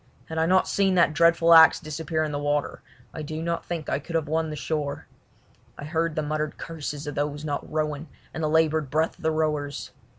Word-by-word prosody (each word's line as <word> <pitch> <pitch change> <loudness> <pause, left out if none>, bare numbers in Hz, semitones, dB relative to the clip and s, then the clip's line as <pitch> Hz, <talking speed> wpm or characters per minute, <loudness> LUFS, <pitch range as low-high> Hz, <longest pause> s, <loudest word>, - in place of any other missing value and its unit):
Had 160 0 -3
I 160 - +2
not 185 +1 +3
seen 195 -2 +2
that 170 -3 +4
dreadful 170 0 +5
axe 160 -1 +8
disappear 155 +1 -3
in 155 - -2
the 145 - -2
water 145 0 -1 0.3
I 155 - -6
do 155 +1 -5
not 170 0 -2
think 165 -3 -4
that - - -3
I - - +1
could 165 +3 -7
have 160 -3 0
won 160 +1 0
the 155 - -5
shore. 150 -2 -3 0.7
I 145 - -7
heard 165 0 -1
the 155 - -1
muttered 155 0 -3
curses 150 -2 -6
of 145 - -4
those 145 +1 -3
not 145 -2 -4
rowing 155 0 -2 0.3
and 160 - -5
the 155 - +1
laboured 160 -2 +2
breath 160 +3 0
of - - -18
the 160 - +1
rowers. 150 -3 -2
155 Hz, 225 wpm, -25 LUFS, 150-165 Hz, 0.7 s, axe